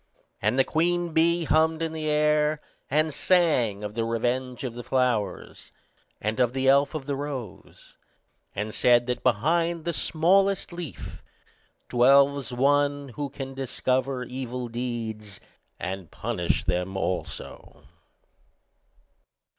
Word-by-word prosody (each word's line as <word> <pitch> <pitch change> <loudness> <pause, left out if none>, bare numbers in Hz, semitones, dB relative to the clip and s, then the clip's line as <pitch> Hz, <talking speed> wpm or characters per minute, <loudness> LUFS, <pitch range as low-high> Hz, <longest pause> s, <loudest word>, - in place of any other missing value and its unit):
And 125 - +1
the 135 - +5
queen 170 +3 0
bee 170 +2 +3
hummed 160 +1 +2
in 160 -1 -2
the 155 -1 -3
air, 150 0 +2 0.3
and 155 +2 +1
sang 130 - +2
of 105 0 -5
the 115 +1 -1
revenge 120 +3 -2
of 125 -3 -3
the 120 +1 -7
flowers, 120 -8 -1 0.5
and 110 +3 -2
of 125 -1 +2
the 130 0 0
elf 140 +3 +4
of 145 -4 -4
the 140 0 -2
rose 135 -9 -8 0.6
and 105 +2 -3
said 120 -1 +4
that 125 0 -2
behind 165 +8 +1
the 170 - -1
smallest 190 +5 +2
leaf 170 -4 -7 0.7
dwells 140 +2 +4
One, 145 +2 +1
who 140 +3 -5
can 135 -1 -7
discover 130 0 -1
evil 125 -1 -5
deeds, 115 -4 -5 0.4
and 95 -2 -5
punish 105 -7 -2
them 90 +2 -1
also. 95 -1 -5
135 Hz, 125 wpm, -26 LUFS, 120-155 Hz, 0.7 s, the